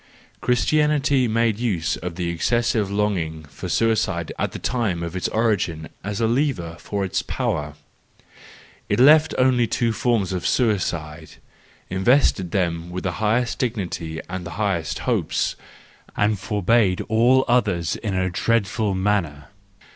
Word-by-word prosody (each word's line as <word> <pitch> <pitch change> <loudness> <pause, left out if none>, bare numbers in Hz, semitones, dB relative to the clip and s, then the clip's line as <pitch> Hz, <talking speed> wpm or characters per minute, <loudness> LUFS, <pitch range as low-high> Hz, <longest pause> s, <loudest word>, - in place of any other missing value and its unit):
—Christianity 140 +1 +2
made 115 -1 +1
use 95 -10 0
of 85 0 -6
the 85 -1 -2
excessive 110 +4 0
longing 95 -7 -1
for 70 - -8
suicide 115 -2 0
at - - -1
the - - -6
time 105 -9 -1
of 85 +1 -5
its 95 - -1
origin 100 -8 0
as 105 0 -4
a 115 - +2
lever 115 - 0
for 100 -1 -3
its 95 0 -1
power: 80 - -3 1.1
it - - +1
left 155 +4 +6
only 125 -2 +3
two 115 -1 0
forms 115 -7 0
of 90 - -2
suicide, 85 - -1 0.5
invested 95 -1 +2
them 85 -2 -1
with 90 +1 -5
the 90 - -1
highest 115 +4 +1
dignity 95 - -3
and 90 0 -5
the 85 - -7
highest 95 -7 -1
hopes, - - 0 0.6
and 105 -1 +1
forbade 105 -1 +1
all 120 +4 +3
others 100 -9 +1
in 105 -4 -3
a 95 0 0
dreadful 105 0 0
manner. 95 -7 -1
105 Hz, 140 wpm, -22 LUFS, 90-120 Hz, 1.1 s, left